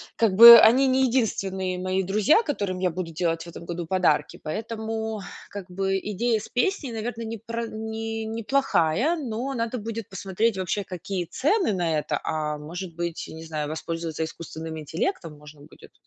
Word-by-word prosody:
как 220 -4 +2
бы, 235 +1 +12
они 255 +5 +6
не 260 0 +3
единственные 190 -6 -1
мои 185 +1 -1
друзья, 210 - +3
которым 200 - -2
я 180 -2 +1
буду 170 -1 -5
делать 165 0 -1
в 170 - -10
этом 170 - -10
году 170 -1 -5
подарки, 155 -6 +1
поэтому, 220 +3 -4 0.3
как 195 -3 -8
бы, 195 +1 0
идея 220 +3 -1
с - - -10
песней, 280 -1 0
наверно, 225 +1 -4
непр 230 +1 -5
не 220 0 -4
неплохая, 230 - +1
но 260 -2 -4
надо 230 +1 -2
будет 225 0 -5
посмотреть, 195 +3 -1
вообще, 190 +2 -2
какие 185 0 -4
цены 305 - +1
на 170 -4 0
это, - - -2
а, 150 -1 -2
может 170 +3 -7
быть, 170 -1 -4
не 160 0 -9
знаю, 155 -2 -4
воспользоваться 160 +1 -4
искусственным 160 0 -7
интеллектом 160 - -3
можно 150 0 -15
будет. 150 - -16
195 Hz, 165 wpm, -25 LUFS, 165-230 Hz, 0.3 s, бы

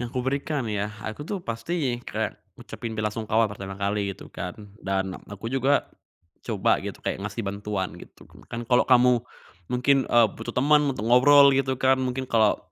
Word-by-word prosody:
Yang 120 -1 -4
kuberikan 135 +1 -1
ya, 105 -1 -2 0.2
aku 110 +6 -5
tuh 195 +6 -4
pasti 125 +1 -2
kayak - - -2 0.2
ngucapin 115 -1 -7
belasungkawa 110 +1 +1
pertama 95 -1 -7
kali 100 0 -1
gitu - - -12
kan, 90 +1 -5 0.3
dan 95 -1 -1
ak - - -20 0.2
aku 110 - -7
juga 135 +2 +2 0.6
coba - - +2
gitu - - -6
kayak - - -2
ngasih 100 +3 -4
bantuan 100 -1 -3
gitu. - - -15 0.2
Kan 115 0 -5
kalau 125 +1 +4
kamu 125 -2 +5 0.5
mungkin, 135 +2 +3
eee, 120 -1 +5
butuh 115 +1 -6
temen 145 +2 +4
untuk 105 - -5
ngobrol 140 +4 +7
gitu 135 -1 +1
kan, 130 0 +3
mungkin 130 +1 -2
kalau, 110 -2 +3
120 Hz, 170 wpm, -25 LUFS, 105-135 Hz, 0.6 s, ngobrol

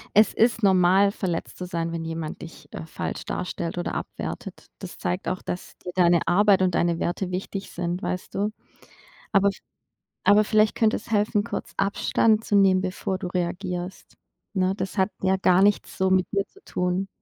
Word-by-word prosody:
Es 215 +1 +6
ist 230 0 +2
normal, 190 +1 +5
verletzt 180 -5 -4
zu 180 - -5
sein, 170 -1 -3
wenn 165 -1 -4
jemand 160 -1 -5
dich, 165 - -12
äh, - - -7
falsch - - -5
darstellt 175 -1 -3
oder - - -3
abwertet. - - -6
Das - - -9
zeigt 90 - -2
auch, 185 - -2
dass 180 - -6
dir 180 - -7
deine 175 -2 +3
Arbeit 195 +2 +4
und 180 -2 +2
deine 170 -1 +1
Werte 180 +1 -2
wichtig 195 +1 -4
sind, 175 +1 -3
weißt 180 - -4
du? 205 +2 +1 0.8
Aber 200 0 +4 0.8
aber 210 +1 +6
vielleicht 215 0 +3
könnte 225 -2 +2
es 225 - -10
helfen, 210 0 +2
kurz - - -5
Abstand 215 +2 +2
zu 205 - -2
nehmen, 190 -2 +5
bevor 185 0 -3
du 185 - -5
reagierst, 180 0 -4 0.4
ne? 190 -1 +1
Das 195 0 -4
hat 190 +2 +3
ja 190 0 +3
gar 185 0 +4
nichts 205 0 +2
so 190 0 +1
mit 185 -1 +3
dir 200 0 0
zu 400 - -22
tun. 180 +2 -1
185 Hz, 180 wpm, -25 LUFS, 175-200 Hz, 0.8 s, Es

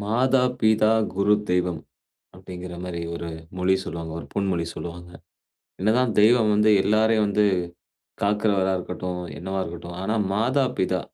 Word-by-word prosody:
"மாதா, 125 +4 +2 0.2
பிதா, 110 -1 +4 0.2
குரு, 100 +2 +3 0.2
தெய்வம்" 90 -2 0 0.5
அப்பிடிங்கிற 90 -1 -9
மாரி 85 -2 -5
ஒரு 85 0 -5 0.3
மொழி 90 +1 +3
சொல்லுவாங்க, 80 0 -6
ஒரு - - -8
பொன்மொழி 95 -4 0
சொல்லுவாங்க. 85 +1 -8 0.7
என்னதான் 115 +4 +2
தெய்வம் 110 0 +5
வந்து 105 +1 +4
எல்லாரையும் 110 +1 +3
வந்து 105 +1 +2 0.8
காக்கிறவரா 100 -2 +1
இருக்கட்டும், 90 0 -5 0.2
என்னவா 95 +2 -4
இருக்கட்டும், 85 0 -7
ஆனா 105 +3 -1 0.2
மாதா, 130 +6 +2
பிதா 95 0 +1
95 Hz, 130 wpm, -24 LUFS, 90-110 Hz, 0.8 s, தெய்வம்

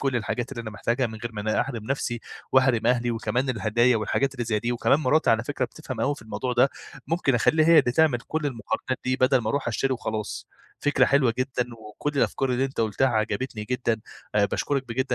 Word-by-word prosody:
كُلّ 135 -3 0
الحاجات 120 +3 -3
اللي 120 - -5
أنا 110 -2 -6
محتاجها 120 +5 0
من 110 -1 -8
غير 120 0 -6
ما 105 - -5
أنا 110 +1 +1
أحرِم 120 -4 -4
نفسي 120 -2 -2 0.3
واحرِم 130 -4 +3
أهلي، 120 -1 +2
وكمان 115 +3 -1
الهدايا 120 +2 +2
والحاجات 135 +5 0
اللي 120 -2 -3
زي 110 -2 0
دي، 120 +3 -1
وكمان 130 +4 +2
مراتي 150 -2 +3
على 115 +1 +2
فكرة 140 -1 -1
بتفهم 130 -3 -7
أوي 140 +5 +1
في 140 - -13
الموضوع 125 +3 -3
ده، 125 +3 +4 0.4
ممكن 160 -6 +1
أخلّيها 155 +6 +3
هي 165 -1 +7
اللي 120 - +3
تعمل 155 -4 +3
كُلّ 155 +2 -3
المقارنات 130 +1 -3
دي 130 0 +1
بدل 130 0 +4
ما 110 -3 -3
أرُوح 140 -2 -1
أشتري 130 +4 0
وخلاص، 110 -3 -4 0.3
فكرة 145 -3 +3
حلوة 130 -5 +3
جدًا، 130 -1 0
وكُلّ 110 +7 -5
الأفكار 135 -1 +1
اللي 125 +1 +1
أنت 135 -3 -3
قلتها 110 +4 +2
عجبتني 110 0 -2
جدًا، 120 -2 -1 0.3
آآ، 105 -1 +4
باشكرك 135 +7 -1
بجِد 130 +2 -1
125 Hz, 215 wpm, -25 LUFS, 115-135 Hz, 0.4 s, هي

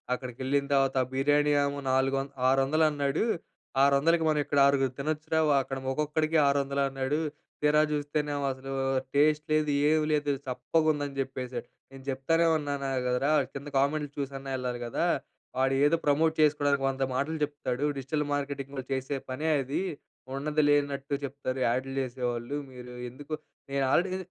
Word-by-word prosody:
అక్కడికి 125 -1 -8
వెళ్ళిన 140 +1 +1
తర్వాత 135 -1 +2 0.2
బిర్యానీ 145 +2 +3
ఏమో 140 0 -3
నాలుగు 135 +1 +2 0.3
ఆరు 135 +1 +4
వందలు 155 +3 +3
అన్నాడు. 145 +5 0 0.6
600కి 155 +4 +4
మనం 155 -1 +2
ఇక్కడ 145 - +1
ఆరుగురు 135 -2 +2
తినొచ్చురా! 155 +2 -1 0.2
అక్కడ 135 0 -5
ఒక్కొక్కరికి 155 +3 0
600 140 0 +1
అన్నాడు. 135 +2 -1 0.4
తీరా 150 +1 +4
చూస్తేనేమో 145 -1 -1
అసలు 135 +1 -8 0.4
టేస్ట్ 150 +1 +3
లేదు, 155 -1 +2 0.2
ఏమి 155 0 +3
లేదు 145 -1 +1 0.2
చప్పకుందని 145 +2 0
చెప్పేసారు. 125 -2 -5 0.2
నేను 135 0 -12
చెప్తానే 165 +6 +2
ఉన్నాను 140 -2 -3 0.2
కదరా, 125 +4 +1 0.2
కింద 140 +1 -7
కామెంట్‌లు 145 +1 0
చూసన్నా 135 -1 -4
వెళ్ళాలి 125 -1 -3
కదా! 120 - -1 0.5
వాడు 135 +1 +2
ఏదో 150 +3 +5
ప్రమోట్ 155 +2 +3
చేసుకోవడానికి 145 -2 +3
వంద 135 0 -1
మాటలు 145 +5 -1
చెప్తాడు. 145 -2 -2
డిజిటల్ 150 +3 -2
మార్కెటింగ్ 140 -1 -3
వాళ్ళు 130 -2 -6
చేసే 135 +2 -2
పనే 150 +5 -2
అది. 135 +2 -2 0.6
ఉన్నది 150 +2 0
లేనట్టు 140 -1 +1
చెప్తారు. 135 -1 -4
యాడ్లు 130 +3 -1
చేసేవాళ్ళు. 125 0 -3 0.2
మీరు 125 -1 -10 0.2
ఎందుకు" 145 +5 -9 0.4
నేను 140 0 +1
ఆల్రెడీ 185 +2 +2
140 Hz, 145 wpm, -29 LUFS, 135-150 Hz, 0.6 s, ఏదో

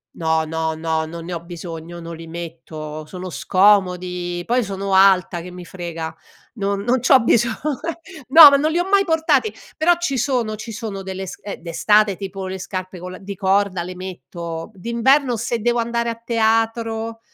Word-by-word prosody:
No, 160 -1 +1
no, 160 0 -2
no, 160 0 -1
non 165 +1 -8
ne 180 - -5
ho 170 - -3
bisogno, 170 -1 -8
non 165 0 -7
li 165 - -10
metto, 160 -2 -7
sono 185 +3 -7
scomodi, 180 -2 +2
poi 245 +4 +1
sono 195 -1 -2
alta 190 -2 +4
che 180 +2 -9
mi 180 0 -9
frega, 165 -3 -6 0.4
non 200 -3 -2
non 245 +4 +1
c'ho 260 +2 +6
biso 235 0 +3 0.8
no 305 +1 +11
ma 280 - +4
non 305 +3 +1
li 340 - +1
ho 360 +2 -1
mai 395 0 +4
portati, 305 - +2 0.2
però 345 +3 +4
ci 275 -6 -1
sono 240 -4 0
ci 225 +2 -8
sono 205 -3 -5
delle 190 0 -5
sc - - -8
eh, 205 - -5
d'estate 200 +4 +2
tipo 195 0 -6
le 190 0 -4
scarpe 185 0 -6
con 180 +1 -7
la 185 - -8
di 200 +1 -7
corda 190 -1 +1
le 180 +1 -7
metto, 170 -1 -7
d'inverno 235 +6 +2
se 235 +1 -2
devo 240 +1 +1
andare 235 0 -1
a 230 - -3
teatro 225 0 0
195 Hz, 185 wpm, -21 LUFS, 175-230 Hz, 0.8 s, no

